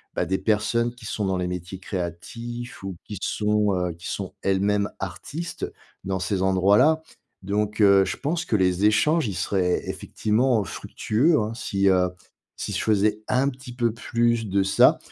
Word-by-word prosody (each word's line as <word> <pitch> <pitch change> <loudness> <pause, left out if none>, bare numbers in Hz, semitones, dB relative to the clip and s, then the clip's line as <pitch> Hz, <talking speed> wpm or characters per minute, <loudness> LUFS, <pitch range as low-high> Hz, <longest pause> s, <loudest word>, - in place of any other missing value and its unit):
bah, - - +1
des 95 +3 0
personnes 110 +4 +1
qui 125 - -16
sont 105 -1 -2
dans 95 -1 0
les 90 - -1
métiers 90 +1 -5
créatifs 115 +8 -6
ou 95 -1 -5
qui 105 - -7
sont, 105 -1 +1
heu, 90 -1 -1
qui 85 +2 -10
sont 95 -2 -4
elles-mêmes 100 +1 +1
artistes 165 +3 -5 0.4
dans 95 0 -1
ces 95 +1 -1
endroits-là 100 - +4 0.4
donc 105 +2 -1
heu, 100 -1 +6
je 90 - -3
pense 165 +4 -2
que 115 - 0
les 95 0 +2
échanges, 150 +8 +3
ils 100 - -3
seraient 90 -2 0
effectivement 110 +1 +1
fructueux, 125 - 0
hein 105 +1 -2
si, 100 -4 +1
heu, 90 -1 +4 0.5
si - - -5
je - - -1
faisais 105 0 +2
un 130 +2 +2
petit 130 -2 -10
peu 120 -2 +1
plus 115 -1 0
de 100 0 +2
ça. 95 - +5
105 Hz, 170 wpm, -24 LUFS, 95-120 Hz, 0.5 s, heu